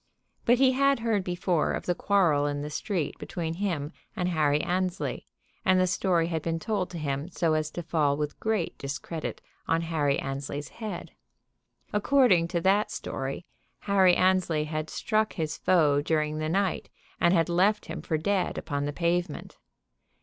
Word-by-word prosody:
But 240 +1 +5
he 265 0 +5
had 275 -1 +2
heard 220 -4 +1
before 175 -2 0
that - - 0
of - - -9
the 175 - +1
quarrel 170 -7 +2
in 145 0 -2
the 150 - -5
street 160 -1 -2
between 165 -2 -4
him 170 -5 -2 0.2
and 180 -1 0
Harry 150 -4 +2
Annesley; 185 +3 -2 0.4
and 185 0 +4
the 185 - +4
story 180 -2 +1
had 165 -1 -2
been 165 +1 -1
told 200 +1 -2
to 175 - -7
him 145 +1 -3
so 165 -2 0
as 155 -1 0
to 175 - -6
fall 150 -3 +1
with 150 -1 -3
great 220 -6 -1
discredit 140 +4 -5 0.3
on 165 0 +2
Harry 150 -4 0
Annesley's 140 +2 -4
head. 215 -6 -6 0.8
According 210 -6 +4
to 170 0 -1
that 195 +4 +3
story 135 +6 -5 0.4
Harry 190 -3 +4
Annesley 185 -4 +2
had 155 0 -4
struck 215 -1 0
his 160 -2 -2
foe 150 -6 +3
during 155 0 0
the 155 0 -1
night 190 +2 0 0.3
and 170 - +4
had 165 -3 +3
left 190 +5 +2
him - - -6
for 160 - -1
dead 195 +3 0
upon 145 -2 -2
the 145 - -3
pavement. 175 0 -2
170 Hz, 170 wpm, -27 LUFS, 150-190 Hz, 0.8 s, But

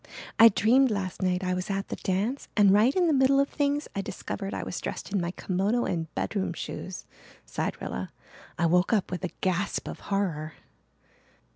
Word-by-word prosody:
"I 230 +1 +10
dreamed 250 +6 +4
last 195 -4 -3
night 185 0 +1
I 185 0 0
was 180 +1 -3
at 195 0 -2
the - - -3
dance 210 +8 -1
and 200 -2 +6
right 220 +6 +4
in 365 -2 +3
the 325 - +3
middle 270 0 +4
of 280 - +2
things 290 0 0
I 200 - 0
discovered 195 +1 -5
I - - -3
was - - -5
dressed - - -5
in 200 - +1
my 170 - -2
kimono 195 +6 0
and 165 -2 -2
bedroom 195 -4 -1
shoes," 185 +2 -6 0.4
sighed - - -3
Rilla. - - -5 0.5
"I 170 - +2
woke 180 +5 +3
up 200 -4 +1
with 180 +1 -4
a 180 - -1
gasp 190 +2 -1
of - - -6
horror." 165 -6 -1
195 Hz, 190 wpm, -27 LUFS, 185-230 Hz, 0.5 s, I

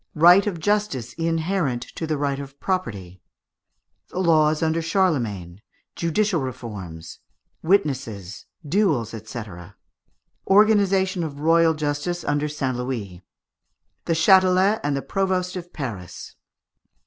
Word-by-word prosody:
Right 175 +6 +6
of 180 -5 -2
Justice 160 - -1
inherent 165 -4 -1
to 160 - -4
the 155 -1 -1
Bight 140 -1 -1
of 140 0 -9
Property. 100 - -3 0.9
The - - -9
Laws 155 -3 +3
under 160 +1 +1
Charlemagne. 120 - -1 0.3
Judicial 170 -5 0
Forms. 95 -10 -9 0.4
Witnesses. 130 - -1 0.2
Duels, 150 - +1 0.2
&c. 120 - -5 1.1
Organization 195 -3 +3
of 145 -3 -6
Royal 165 0 +4
Justice 155 +3 -2
under 145 +1 -1
St. 130 -4 -2
Louis. 110 -8 -5 0.8
The 165 - +1
Châtelet 185 +4 +4
and 145 -1 0
the 135 - -4
Provost 185 -1 -1
of 175 -1 -7
Paris. 105 - -7
155 Hz, 115 wpm, -23 LUFS, 125-185 Hz, 1.1 s, Right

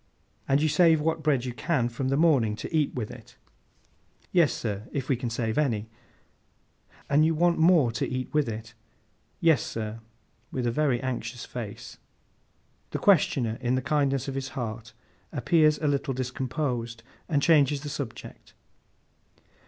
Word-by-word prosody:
'And 140 +2 +3
you - - +3
save 160 +1 +4
what 160 +1 -1
bread 140 -5 +1
you 125 - -4
can 125 -1 0
from 120 +3 -3
the 135 +1 +1
morning, 140 -10 +3
to 160 - -5
eat 150 -3 +2
with 115 -4 -4
it?' - - -13 1.0
'Yes, 170 -5 +4
sir—if 115 +5 -4
we 135 - +2
can 120 0 -4
save 115 +2 -1
any.' 115 -7 -1 1.2
'And 145 +2 +4
you 160 +1 +2
want 170 +1 +2
more 160 -7 +5
to 115 - -2
eat 130 0 -4
with 150 -5 +2
it?' 115 +1 -7 0.7
'Yes, 160 -8 +4
sir.' 110 0 -5 0.5
With 125 -2 -2
a 120 - +1
very 135 -2 +1
anxious 120 -2 -4
face. 115 -5 -8 0.9
The - - -3
questioner, 135 - +2
in 125 0 +1
the 130 - 0
kindness 140 -2 +1
of 135 - -3
his 135 0 -3
heart, 115 -2 -5 0.4
appears 155 -3 +3
a 155 - -1
little 140 -2 0
discomposed, 125 -2 -3 0.3
and 150 -4 +2
changes 145 -3 +4
the 150 - -6
subject. 140 -5 -7
135 Hz, 155 wpm, -27 LUFS, 120-150 Hz, 1.2 s, more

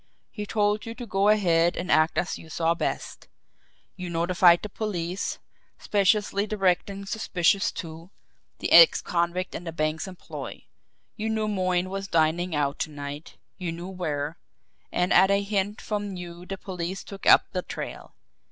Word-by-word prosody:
He 210 -2 -6
told 210 0 0
you 230 - -6
to 245 0 -7
go 200 -2 +2
ahead 175 -5 +3
and 175 - -2
act 155 +1 +3
as 180 - -1
you 160 - -13
saw 165 +1 +1
best. 170 - -4 0.7
You 180 -2 -6
notified 170 +1 +4
the - - -3
police, 190 -3 -3 0.4
speciously 205 0 +1
directing 195 -1 0
suspicion 195 -2 +1 0.2
to 165 +1 -8 0.5
the - - -3
ex - - +9
convict 175 +1 -1
in - - -6
the 165 - -5
bank's 155 +1 -2
employ. 185 -2 -8 0.5
You 220 0 -3
knew 220 -1 0
Moyne 185 -2 0
was 195 0 -4
dining 165 +1 +1
out 145 -1 0
to - - -1
night, 145 +1 -8 0.2
you 180 -2 -3
knew 170 +2 -7
where 160 -4 -3 0.5
and 180 +1 +1
at 190 +2 +6
a 200 0 +2
hint 205 0 -1
from 205 -2 -3
you 175 0 -9
the 195 - -4
police 185 -1 -5
took 195 -1 -8
up - - +6
the 185 - -2
trail. - - -7
180 Hz, 160 wpm, -26 LUFS, 170-200 Hz, 0.7 s, ex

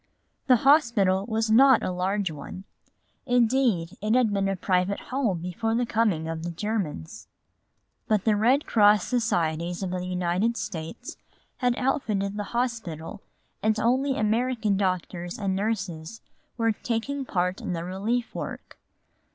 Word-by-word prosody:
The 255 - +7
hospital 230 -10 +4
was 220 -1 0
not 265 +2 +6
a - - -1
large 185 +1 -1
one; 155 +5 -8 0.6
indeed, 240 -8 +2
it 215 +3 +1
had 240 -5 +3
been 195 -1 +1
a 195 - 0
private 185 +1 0
home 230 -11 -2
before 225 +6 -2
the 245 +1 +1
coming 210 -9 0
of 160 0 -4
the 170 - -4
Germans. 175 - -4 0.8
But 210 -3 +2
the 220 -2 +4
Red 250 +8 +3
Cross 210 -3 +5
Societies 175 -7 -1
of 185 - -3
the 180 -1 -3
United 185 +6 0
States 210 +5 -6 0.4
had 245 -2 +1
outfitted 205 -7 -1
the 205 0 -3
hospital 220 -7 -3 0.4
and 215 0 +1
only 260 +4 +1
American 220 0 +1
doctors 180 -2 -2
and 195 -2 -1
nurses 190 -2 -3 0.4
were 230 -1 +2
taking 240 +6 -3
part 180 -6 -1
in - - -3
the 165 -1 -3
relief 210 +7 -2
work. - - -7
210 Hz, 145 wpm, -26 LUFS, 180-235 Hz, 0.8 s, The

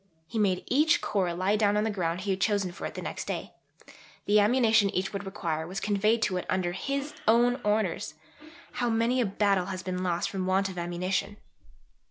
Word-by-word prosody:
He 220 - -3
made 190 -3 +1
each 315 +6 +3
Corps 190 -4 0
lie 185 +4 +1
down 205 -1 +2
on 210 - +2
the 220 - 0
ground 175 -3 -2
he 195 +1 -1
had 190 0 -2
chosen 200 -4 +1
for - - -5
it - - -10
the - - -5
next - - -5
day; - - -4 0.7
the 210 +1 +4
ammunition 220 -1 +4
each 190 +1 -2
would 200 0 -5
require 160 -5 -3
was 190 +3 -4
conveyed 215 +2 +1
to 185 - 0
it 180 - -5
under 185 -2 0
his 275 +10 -3
own 240 +3 +4
orders 210 -7 0 0.6
(how 245 -1 -1
many 230 +3 +2
a 235 - +1
battle 195 -2 +1
has 185 -1 -5
been 185 -1 -3
lost 175 -2 -1
from 185 -2 -3
want 195 +1 +2
of 185 - -8
ammunition!) 180 +4 -2
200 Hz, 205 wpm, -28 LUFS, 185-220 Hz, 0.7 s, the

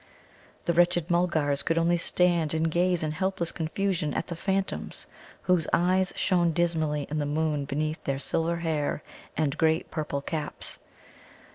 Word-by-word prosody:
The 170 - +2
wretched 175 0 +3
Mulgars 160 -5 +2
could 165 - 0
only 170 +1 +3
stand 170 -2 +2
and 160 0 +1
gaze 175 0 +2
in 155 - 0
helpless 180 +1 -1
confusion 170 -1 -1
at - - -1
the 170 - -5
phantoms, 195 +3 -2 0.4
whose 180 -4 +2
eyes 185 +2 +3
shone 175 -3 +2
dismally 160 -4 0
in 155 - 0
the 145 - -1
moon 150 -1 0
beneath 155 +3 -2
their 135 -1 -1
silver 165 +4 0
hair 155 -3 -1 0.3
and 150 -3 +1
great 160 0 +2
purple 150 -3 -2
caps. 150 +1 -4
165 Hz, 150 wpm, -27 LUFS, 155-175 Hz, 0.4 s, wretched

